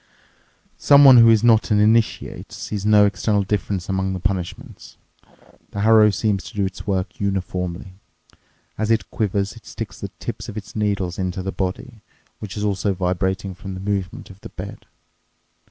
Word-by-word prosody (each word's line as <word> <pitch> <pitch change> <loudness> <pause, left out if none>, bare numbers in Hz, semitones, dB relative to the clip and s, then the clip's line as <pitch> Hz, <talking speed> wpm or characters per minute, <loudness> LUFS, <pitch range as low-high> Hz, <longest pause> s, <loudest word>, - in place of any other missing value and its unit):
Someone 140 -3 +8
who 115 -1 +8
is 110 -1 +4
not 115 -2 +4
an 105 -2 +3
initiate 110 +2 +1
sees 105 -1 -5
no 105 -1 +6
external 105 0 0
difference 100 -2 -2
among 95 0 -1
the 95 - -4
punishments. 90 -1 -5 0.7
The 100 - -5
harrow 110 0 +6
seems 100 -3 -1
to - - -11
do 100 -1 0
its 95 -1 -7
work 95 -2 -2
uniformly. 90 -2 -3 0.9
As 110 0 -1
it 115 0 0
quivers, 100 -2 -1
it - - -15
sticks - - -7
the - - -5
tips - - -6
of 105 - -8
its 100 - -8
needles 100 -4 -1
into 95 0 -3
the 95 - -3
body, 105 +5 -5 0.4
which 105 -1 -7
is 105 - -3
also 100 -1 0
vibrating 95 +1 -2
from 95 +1 -8
the - - -7
movement 95 -1 -4
of 95 - -17
the - - -9
bed. - - -9
100 Hz, 170 wpm, -21 LUFS, 95-105 Hz, 0.9 s, Someone